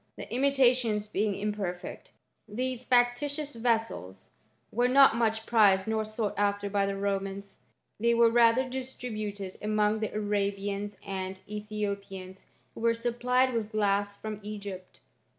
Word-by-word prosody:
The - - -8
imitations 250 -5 +2
being 210 0 0
imperfect, 200 -3 -4 0.4
these 250 +3 -3
factitious 275 +4 +1
vessels 225 - -2 0.4
were 245 +2 +2
not 270 -1 +6
much 225 -1 0
prized 200 -4 +4
nor 220 0 0
sought 215 -1 -2
after 205 0 0
by 200 -1 +2
the 200 - -1
Romans^ 195 0 -3 0.5
they 235 +1 +3
were 230 0 +5
rather 240 +2 +4
distributed 215 -7 -5
among 215 0 +1
the 215 - -2
Arabians 205 -1 -2
and 190 -1 -4
Ethiopians, 200 -3 -5 0.3
who - - -10
were 230 0 +3
supplied 245 +2 +1
with 220 -2 -2
glass 205 -1 +1
from 215 0 -6
Egypt. 200 -3 -8
215 Hz, 130 wpm, -29 LUFS, 200-235 Hz, 0.5 s, not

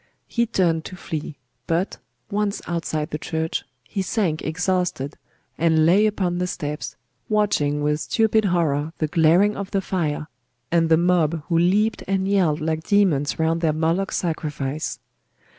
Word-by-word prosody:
He 235 0 0
turned 170 -7 +1
to 185 - -7
flee: 155 -4 -5 0.3
but, 170 +4 -1 0.3
once 205 0 0
outside 160 -3 -2
the 150 - -3
church, 160 0 -2 0.2
he 155 - -3
sank 185 -5 0
exhausted, 175 -3 -1 0.4
and 160 -1 +4
lay 195 +6 +5
upon 185 -4 -1
the 180 - 0
steps, 145 -8 -4 0.3
watching 150 -9 +1
with 150 0 +1
stupid 220 +3 +2
horror 160 -4 +1
the 155 - 0
glaring 170 +7 +4
of 200 -1 -5
the 195 - 0
fire, 165 -6 -2 0.5
and 165 -1 +3
the 160 - +6
mob 170 -3 +2
who 165 -1 +3
leaped 205 +6 +2
and 190 0 0
yelled 180 -7 +2
like 160 0 -1
demons 165 -8 +2
round 165 +1 +1
their 160 -2 +2
Moloch 165 +5 0
sacrifice. 150 -4 -2
165 Hz, 150 wpm, -23 LUFS, 155-190 Hz, 0.5 s, the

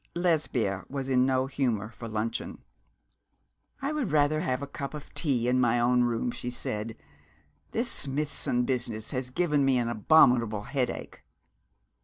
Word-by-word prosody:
Lesbia 145 - 0
was 135 -1 -4
in 130 0 +3
no 130 0 +2
humour 120 -6 -1
for 115 0 -8
luncheon. 110 +1 -4 1.2
'I 280 - 0
would 290 -9 -1
rather 155 +1 +3
have 130 -1 -1
a - - -1
cup 140 +1 -6
of 150 - -10
tea 130 -7 0
in 125 +1 +3
my 120 -1 +3
own 125 +1 +3
room,' 120 0 -1
she 120 - -5
said. 115 -2 -4 0.7
'This 235 +2 -1
Smithson 140 -3 0
business 120 -4 -2
has 130 -2 -3
given 150 0 +1
me 135 -1 +3
an 120 -1 0
abominable 115 -3 +4
headache.' 130 +2 -3
125 Hz, 150 wpm, -28 LUFS, 115-145 Hz, 1.2 s, abominable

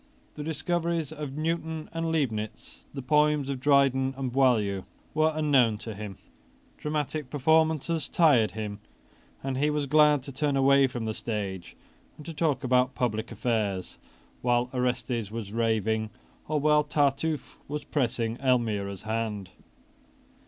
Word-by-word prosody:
The 150 - -6
discoveries 165 0 -1
of 150 -3 -6
Newton 160 0 -2
and 165 0 -1
Leibnitz, 110 -9 -3
the 135 -2 -6
poems 150 0 +2
of 135 - -4
Dryden 135 -1 +3
and 130 -2 -2
Boileau, 110 -7 +2 0.3
were 155 +1 +3
unknown 135 -8 +3
to 110 +1 -7
him. 100 -2 -7 0.6
Dramatic 150 -2 -2
performances 160 +2 +2
tired 140 -10 +4
him; 105 -1 -5 0.6
and 135 -1 -2
he 145 +3 +2
was 150 -1 0
glad 150 -1 +4
to 140 - -7
turn 140 +1 0
away 135 0 +5
from 120 -3 -5
the 110 - -2
stage 100 -6 -4 0.4
and 150 - -11
to 165 - -6
talk 150 -4 0
about 125 0 +2
public 110 -2 -1
affairs, 105 -5 -2 0.4
while 120 0 +1
Orestes 125 -3 -1
was 110 -2 -6
raving, 110 -1 0 0.4
or 155 0 0
while 150 +1 +4
Tartuffe 145 0 0
was 150 +1 -4
pressing 120 -4 -1
Elmira's 110 -7 0
hand. 110 -3 -3
130 Hz, 140 wpm, -27 LUFS, 115-150 Hz, 0.6 s, away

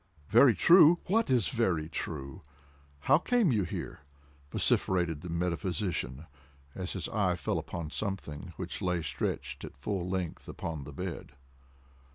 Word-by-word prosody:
"Very 120 0 +7
true!—what 175 - +5
is 125 -7 +3
very 95 -10 0
true?—how 70 - -3
came 235 - +2
you 110 -4 +2
here?" 85 - -5 0.5
vociferated 85 -5 +1
the 90 - -7
metaphysician, 85 -4 -2 0.5
as 95 -1 -4
his 95 - -3
eye 100 -4 +1
fell - - -1
upon 85 -4 -6
something 95 -5 -4
which 95 +1 -5
lay 90 -3 0
stretched - - -3
at - - -9
full 90 +5 -3
length 90 -3 -3
upon 80 -5 -5
the 75 - -8
bed. 85 -3 -6
90 Hz, 130 wpm, -30 LUFS, 75-100 Hz, 0.5 s, Very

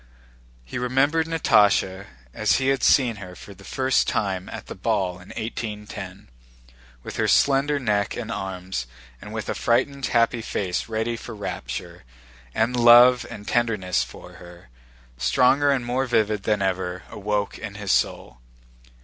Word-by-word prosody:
He 60 - -5
remembered 140 +6 +1
Natásha 100 -11 +2 0.3
as - - +1
he 130 0 +1
had 135 -1 +1
seen 120 -5 +3
her 90 -2 -9
for 100 - -12
the 100 +1 -17
first 130 +5 +1
time 95 -3 -1
at - - -8
the - - -7
ball 95 -3 -1
in 90 - -15
1810, 105 -4 -6 0.8
with - - -7
her - - +1
slender 140 +1 +3
neck 105 -5 0
and 115 -2 -5
arms 95 - -4 0.3
and - - -9
with - - -5
a - - -1
frightened 135 +3 0
happy 115 0 +2
face 95 -2 -3
ready 115 +1 -1
for 115 0 -8
rapture, 100 -9 -6 0.5
and 115 +3 +1
love 120 +1 +7
and 105 0 -9
tenderness 105 - +1
for 60 - -12
her, 85 -6 -14 0.5
stronger 130 - +3
and 135 -3 +1
more 130 +2 -1
vivid 110 -3 +1
than 105 -2 +1
ever, 95 -1 -2
awoke 105 -1 -2
in 105 -3 -7
his 100 -2 -3
soul. 60 -1 -1
110 Hz, 150 wpm, -24 LUFS, 95-125 Hz, 0.8 s, love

